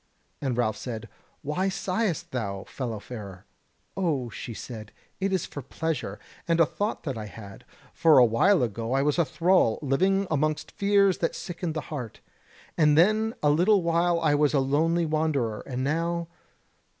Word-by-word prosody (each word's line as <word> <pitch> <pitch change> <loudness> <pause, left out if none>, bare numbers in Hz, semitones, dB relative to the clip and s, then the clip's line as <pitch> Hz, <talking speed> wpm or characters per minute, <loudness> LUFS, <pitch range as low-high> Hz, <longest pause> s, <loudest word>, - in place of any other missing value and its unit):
And 130 -4 -1
Ralph 110 -3 +1
said: 115 -3 -6 0.4
"Why 180 +7 0
sighest 190 -2 -2
thou, 100 -6 -3
fellow 120 -5 -5
farer?" 100 -5 -9 0.5
"O," 145 -11 -1
she - - -7
said, 110 -2 -8 0.3
"it 195 0 0
is 190 -2 0
for 145 - -7
pleasure, 160 +4 -3 0.3
and 165 0 +2
a 165 - +7
thought 205 +7 -3
that 135 -7 -4
I 105 - -6
had: 100 -1 -11 0.3
for 160 -2 +5
a 125 - +8
while 145 - +3
ago 115 +1 -2
I 135 +1 +2
was 150 +3 +1
a 170 - +4
thrall, 170 -9 +2
living 190 +8 +2
amongst 155 +1 0
fears 200 -2 +3
that 165 - -1
sickened 170 -2 -5
the 155 - -1
heart; 125 -7 -6 0.6
and 150 -2 +5
then 215 +6 +3
a 150 - +5
little 185 +5 +4
while 170 +1 +2
I 155 -3 +2
was 145 0 +2
a - - +4
lonely 160 +5 +2
wanderer, 155 -8 0
and 130 -1 -3
now... 170 +3 -1
150 Hz, 170 wpm, -26 LUFS, 125-175 Hz, 0.6 s, a